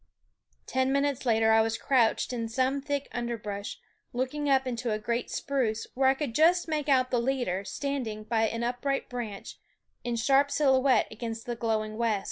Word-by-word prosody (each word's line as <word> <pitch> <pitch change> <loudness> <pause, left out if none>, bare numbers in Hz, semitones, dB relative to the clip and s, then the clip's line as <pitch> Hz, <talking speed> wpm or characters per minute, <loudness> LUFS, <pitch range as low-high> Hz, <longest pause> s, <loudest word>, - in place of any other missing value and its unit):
Ten 260 0 0
minutes 280 -1 0
later 220 -1 +4
I 220 0 +6
was 225 0 0
crouched 250 -2 +2
in 230 -2 -3
some 260 +4 0
thick 285 0 -2
underbrush 220 -4 -4 0.4
looking 265 +4 -2
up 265 -1 +3
into 240 -2 -2
a 215 - 0
great 235 +3 -2
spruce, 240 -6 -1
when 265 0 +3
I 265 - +3
could 270 -4 -3
just 340 +6 +4
make 305 -2 -2
out 255 -2 +3
the 245 - +2
leader 240 -7 -1
standing 245 -4 -3
by 225 0 +1
an 230 +2 -3
upright 250 +3 -2
branch 230 -5 -6 0.4
in 240 -1 -2
sharp 275 +5 +3
silhouette 265 -2 +3
against 225 0 -6
the 240 - -3
glowing 215 -2 -2
west. 225 -3 +1
245 Hz, 175 wpm, -28 LUFS, 225-270 Hz, 0.4 s, I